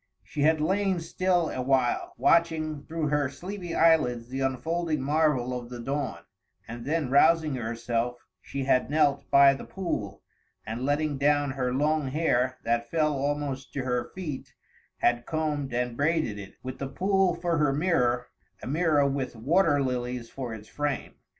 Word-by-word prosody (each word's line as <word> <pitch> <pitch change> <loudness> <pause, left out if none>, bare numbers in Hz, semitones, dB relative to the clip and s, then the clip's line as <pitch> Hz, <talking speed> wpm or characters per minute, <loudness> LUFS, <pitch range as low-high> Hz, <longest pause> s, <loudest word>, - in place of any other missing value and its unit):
She 145 - -5
had 155 +2 +4
lain 190 +3 +1
still 175 0 0
a 130 - -3
while, 130 -1 +1
watching 160 -3 +2
through 160 -2 -2
her 145 -2 +1
sleepy 175 +4 -6
eyelids 140 -8 +3
the 135 +1 -4
unfolding 155 +4 -1
marvel 145 -4 +1
of 120 -1 -6
the 125 -1 -7
dawn; 140 +3 -3 0.4
and 120 +1 -7
then 150 -3 -1
rousing 155 +1 +4
herself, 120 0 -2 0.2
she 140 -1 -4
had 130 -1 +2
knelt 145 -2 +2
by 140 0 +7
the 135 - -7
pool, 110 - -4 0.4
and 115 +3 -4
letting 145 -1 0
down 145 0 +2
her 130 -2 -1
long 150 +2 +1
hair 130 -3 +1
that 120 0 0
fell 155 -2 +1
almost 140 -1 -3
to 135 - -2
her 125 -1 -1
feet 160 -8 -6 0.5
had 120 0 +2
combed 150 -3 -2
and 120 0 -1
braided 145 -7 0
it, 100 -1 -10
with 130 0 -6
the 135 - -3
pool 190 +3 +2
for 170 -2 -1
her 150 -2 +3
mirror 135 -6 +1 0.4
a - - -5
mirror 150 0 +2
with 135 -3 -2
water 145 +4 +2
lilies 125 -2 -3
for 130 -3 -5
its 110 -1 -8
frame. 145 -2 -3
140 Hz, 165 wpm, -27 LUFS, 125-160 Hz, 0.5 s, by